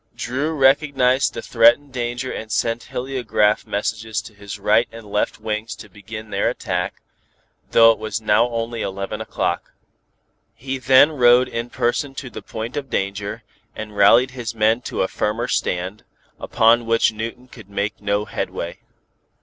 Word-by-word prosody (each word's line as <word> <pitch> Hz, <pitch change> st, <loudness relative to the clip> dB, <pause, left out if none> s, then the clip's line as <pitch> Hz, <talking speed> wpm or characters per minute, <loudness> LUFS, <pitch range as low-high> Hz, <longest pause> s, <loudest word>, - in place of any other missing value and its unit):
Dru 140 Hz, +6 st, -2 dB
recognized 135 Hz, -1 st, +3 dB
the -, -, -5 dB
threatened 120 Hz, +4 st, +4 dB
danger 120 Hz, +1 st, -3 dB
and 110 Hz, 0 st, -6 dB
sent 115 Hz, +1 st, -1 dB
heliograph 125 Hz, -5 st, 0 dB
messages 110 Hz, +2 st, -2 dB
to 110 Hz, -, -12 dB
his 100 Hz, 0 st, -8 dB
right 105 Hz, +3 st, +3 dB
and 115 Hz, -1 st, -11 dB
left 105 Hz, 0 st, -1 dB
wings 110 Hz, +1 st, -4 dB
to 105 Hz, -, -12 dB
begin 110 Hz, +2 st, -9 dB
their 100 Hz, +3 st, +1 dB
attack, 90 Hz, -7 st, -3 dB, 0.7 s
though 115 Hz, 0 st, +7 dB
it 115 Hz, -, -3 dB
was 110 Hz, 0 st, -3 dB
now 110 Hz, +2 st, +3 dB
only 115 Hz, 0 st, -3 dB
eleven 100 Hz, +2 st, -4 dB
o'clock. -, -, -3 dB, 0.8 s
He 130 Hz, +3 st, -5 dB
then 130 Hz, +4 st, +6 dB
rode 125 Hz, -3 st, +5 dB
in 115 Hz, +1 st, -4 dB
person 130 Hz, +3 st, -1 dB
to 130 Hz, -3 st, -7 dB
the -, -, -8 dB
point 115 Hz, +2 st, -6 dB
of 140 Hz, -2 st, -4 dB
danger, 100 Hz, 0 st, -3 dB, 0.3 s
and 105 Hz, -1 st, -7 dB
rallied 115 Hz, +6 st, +5 dB
his 120 Hz, -3 st, -6 dB
men 110 Hz, +2 st, +2 dB
to -, -, -1 dB
a -, -, 0 dB
firmer 110 Hz, +5 st, -2 dB
stand, 90 Hz, +4 st, -2 dB, 0.4 s
upon 115 Hz, 0 st, +3 dB
which 115 Hz, -1 st, +3 dB
Newton 115 Hz, +3 st, -6 dB
could 110 Hz, -5 st, -14 dB
make 100 Hz, +1 st, -3 dB
no 105 Hz, 0 st, 0 dB
headway. 85 Hz, -4 st, -5 dB
115 Hz, 160 wpm, -21 LUFS, 105-125 Hz, 0.8 s, though